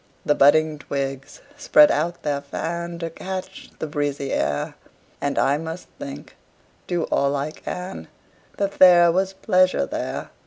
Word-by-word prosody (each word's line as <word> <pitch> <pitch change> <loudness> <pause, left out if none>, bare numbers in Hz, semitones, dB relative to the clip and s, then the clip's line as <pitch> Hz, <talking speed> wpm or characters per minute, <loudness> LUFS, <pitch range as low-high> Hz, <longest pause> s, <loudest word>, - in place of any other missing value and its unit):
The 150 - +4
budding 155 +2 +4
twigs 135 -1 -5 0.2
spread 295 +1 +6
out 170 +3 -1
their 145 -2 -1
fan, 170 +4 -4
To 165 -1 -5
catch 190 +2 -7
the - - -4
breezy 145 -2 -2
air; 70 - -1 0.5
And 140 0 -1
I 140 +2 +2
must 165 +2 -7
think, 280 0 -8 0.5
do 175 -2 -1
all 140 +1 +2
I 140 +2 -2
can, 180 +4 -7 0.5
That 200 -1 -2
there 175 -2 +8
was 190 +2 0
pleasure 185 - +2
there. - - -5
165 Hz, 145 wpm, -23 LUFS, 145-185 Hz, 0.5 s, there